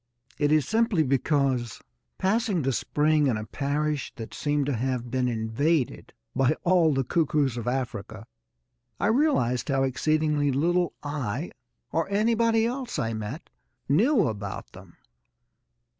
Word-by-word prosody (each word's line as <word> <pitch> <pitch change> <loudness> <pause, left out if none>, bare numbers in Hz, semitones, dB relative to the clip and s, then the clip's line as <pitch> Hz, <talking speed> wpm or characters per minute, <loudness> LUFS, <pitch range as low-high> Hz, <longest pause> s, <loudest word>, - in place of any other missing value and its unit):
It 145 -1 +2
is 155 -3 +3
simply 220 -6 +2
because, 135 -3 0 0.4
passing 200 - +1
the 135 - +1
spring 150 +3 +2
in 120 -5 +1
a 110 - -5
parish 145 +4 -2
that 115 - -8
seemed 145 -1 0
to 140 - -1
have 125 0 -2
been 130 -1 +1
invaded 120 +5 -1 0.2
by 135 +3 +3
all 175 -3 +4
the 135 -2 +1
cuckoos 145 -2 +1
of 120 -1 -5
Africa, 110 -5 -3 0.7
I - - 0
realised 220 - +2
how 135 -1 +2
exceedingly 150 +2 +1
little 175 +5 +1
I, 145 -8 -3 0.4
or - - 0
anybody 225 +2 +2
else 250 -2 -3
I 115 -6 -1
met, 110 -1 -6 0.4
knew 215 - +3
about 100 -3 -5
them. - - -15
145 Hz, 135 wpm, -26 LUFS, 125-170 Hz, 0.7 s, all